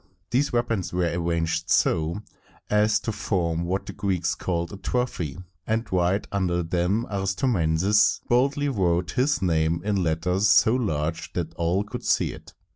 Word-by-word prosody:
These 135 +4 +1
weapons 115 -6 -1
were 90 -1 0
arranged 85 -1 -1
so 80 +6 +1 0.5
as 105 +1 +3
to 115 - -2
form 85 -5 -1
what 95 +3 -2
the - - -7
Greeks 95 -4 -1
called 85 -1 -3
a - - -6
trophy, 95 - -2 0.3
and 110 +1 0
right 90 +2 +1
under 90 -3 0
them 90 +7 0
Aristomenes 95 - +2
boldly 140 +4 +2
wrote 90 - 0
his 135 -3 +1
name 80 -1 +1
in 100 -2 +1
letters 90 +4 +1
so 110 +1 +5
large 80 -10 -2
that 85 -2 -3
all 85 +4 0
could 105 - -7
see - - +1
it. - - -14
95 Hz, 150 wpm, -25 LUFS, 85-105 Hz, 0.5 s, so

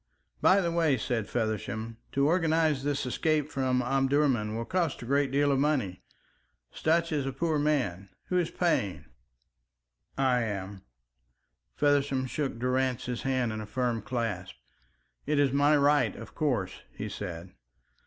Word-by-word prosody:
"By 200 - +5
the 170 -2 0
way," 165 -5 +2
said 110 -2 -2
Feversham, 110 0 -3 0.2
"to 140 0 +2
organise 160 -3 +2
this 145 0 -1
escape 150 +3 0
from 130 -1 +1
Omdurman 135 -4 +1
will 115 +1 -3
cost 170 -6 -1
a - - -7
great 140 +2 +2
deal 140 +2 +2
of 135 - +2
money. 135 -11 0 0.7
Sutch 165 +1 +1
is 145 -3 -1
a - - -1
poor 155 +3 0
man. 120 - 0 0.2
Who 180 - +2
is 170 - 0
paying?" 155 - 0 1.1
"I 130 -2 +2
am." 100 -3 -4 0.9
Feversham 140 -2 +2
shook 135 -1 -3
Durrance's 125 -1 -1
hand 130 -3 0
in 110 - -4
a 105 - -7
firm 120 -1 -1
clasp. 115 -7 -3 0.7
"It 150 0 +1
is 140 -2 +3
my 145 +2 +4
right, 145 +1 +3
of - - -10
course," 125 - -1
he 105 - -4
said. 90 -4 -6
135 Hz, 145 wpm, -29 LUFS, 115-150 Hz, 1.1 s, By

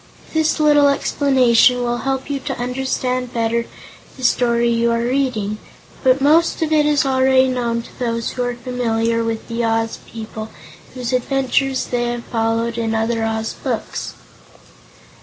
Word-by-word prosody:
This 315 -1 +1
little 295 -1 +5
explanation 255 -3 +3
will 240 0 -1
help 265 +1 -2
you 285 -1 -2
to 270 0 -5
understand 250 0 -2
better 230 0 0 0.5
the 260 - -10
story 235 -1 +2
you 235 0 +2
are 230 - +1
reaching, 240 -5 -1 0.4
but 260 0 +4
most 320 +4 +3
of 315 - -2
it 300 -1 +4
is 290 -2 +2
already 260 0 +3
known 235 -2 -1
to - - -16
those 230 -2 -2
who 250 - -4
are 245 0 -1
familiar 230 -2 -1
with 225 -1 -3
the 235 0 -2
Oz 225 0 0
people 220 -1 -7 0.5
whose 250 0 -3
adventures 265 +1 0
they 240 -1 -1
have 240 0 -3
followed 230 0 -1
in 225 -1 -1
other 225 +1 0
Oz 220 0 -2
books. - - -4
245 Hz, 155 wpm, -19 LUFS, 230-265 Hz, 0.5 s, little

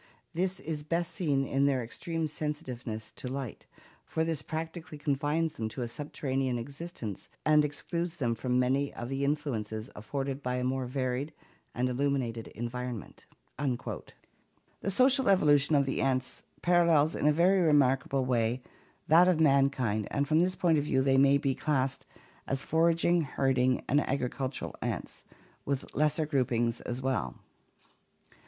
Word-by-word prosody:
This 185 +3 -1
is 155 -2 -4
best 170 +3 -2
seen 145 -6 0
in 135 +1 +2
their 130 -3 +1
extreme 165 +7 -3
sensitive 150 -5 -4
ness 110 -1 -5
to - - -5
light, 130 -3 -5 0.4
for 160 - -1
this 160 -3 -1
practically 160 0 -5
confines 145 +3 0
them 110 -1 -3
to 125 +3 -4
a - - -3
subterranean 135 -1 -2
existence 140 - -7 0.2
and 155 -1 +5
excludes 170 +3 -3
them 120 -7 0
from 125 +2 -1
many 135 +3 +1
of 120 - -5
the 135 +1 -2
influences 120 -7 -2
afforded 135 +5 -4
by 125 -1 -1
a 125 - -1
more 130 0 -1
varied 130 +3 -2 0.4
and 125 +1 +1
illuminated 125 -3 -1
environment." 120 0 -6 0.3
The 140 +7 -6
social 260 +4 +4
evolution 150 -5 +4
of 140 -1 +4
the 135 - -1
ants 130 -1 -1 0.2
parallels 170 -3 +4
in - - +1
a - - +6
very 180 +5 +4
remarkable 135 -4 +3
way 120 0 0 0.4
that 170 +3 +7
of 180 -3 +3
mankind 135 -8 +2
and 140 0 0
from 155 +2 +3
this 180 +2 +2
point 165 -4 +3
of - - -1
view 130 -3 +2
they 135 0 +4
may 140 +1 +6
be 140 -2 0
classed 135 -2 -1 0.4
as 135 0 -1
foraging, 165 +1 +3
herding, 130 -3 +1
and 145 +3 +3
agricultural 130 0 -3
ants, - - -4 0.4
with 140 -1 -3
lesser 155 +1 +2
groupings 120 -5 0
as 125 +2 -4
well. 130 - -1
140 Hz, 150 wpm, -30 LUFS, 125-155 Hz, 0.4 s, that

